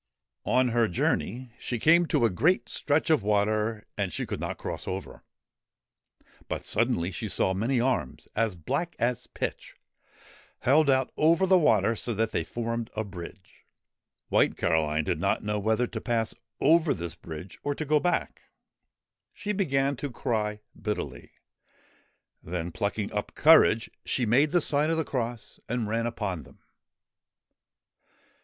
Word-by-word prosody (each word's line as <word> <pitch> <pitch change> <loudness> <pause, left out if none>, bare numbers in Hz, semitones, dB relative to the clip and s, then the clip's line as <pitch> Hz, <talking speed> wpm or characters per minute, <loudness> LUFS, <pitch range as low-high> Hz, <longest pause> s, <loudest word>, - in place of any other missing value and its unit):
On 130 0 +3
her 115 -1 +2
journey 120 +6 -1
she 120 - -3
came 170 +7 +5
to 120 - +2
a 115 - +2
great 165 - +2
stretch 150 +3 +1
of 155 - +4
water 105 +1 0
and 95 -3 0
she - - -3
could - - -4
not - - -4
cross - - -5
over. 95 +1 -5 1.3
But - - -4
suddenly 105 -6 +1
she 110 +3 -4
saw 95 - +1
many 115 +7 0
arms, 120 - -1
as 110 -3 +1
black 140 - -3
as 120 +1 -1
pitch, - - -5 0.9
held 145 +3 +4
out 130 -1 +2
over 165 +4 +4
the 185 0 +5
water 115 - +3
so 115 +1 -2
that 110 +1 0
they - - 0
formed 115 +4 -3
a 110 - -1
bridge. 90 -5 -11 0.7
White - - +3
Caroline 80 -2 +1
did - - -1
not - - 0
know 105 0 -1
whether 110 +4 +1
to - - -6
pass 115 -2 0 0.3
over 160 +2 +4
this 85 -2 -5
bridge 85 +1 -9
or 145 0 -2
to 155 - -4
go 150 +1 +3
back. 175 +2 -1 0.9
She 210 - -4
began 140 -8 +1
to 145 - -4
cry 105 -4 -2
bitterly; 105 -1 -5 1.1
then, 85 0 -4
plucking 100 +3 -2
up 105 0 -3
courage, 145 -7 +5
she 125 - 0
made 130 +7 +4
the 175 +3 +2
sign 150 +1 +2
of 165 - +1
the 160 - 0
cross 120 -3 -4
and 120 -2 -1
ran 115 +2 0
upon 105 -8 -3
them. - - -17
115 Hz, 155 wpm, -27 LUFS, 105-140 Hz, 1.3 s, came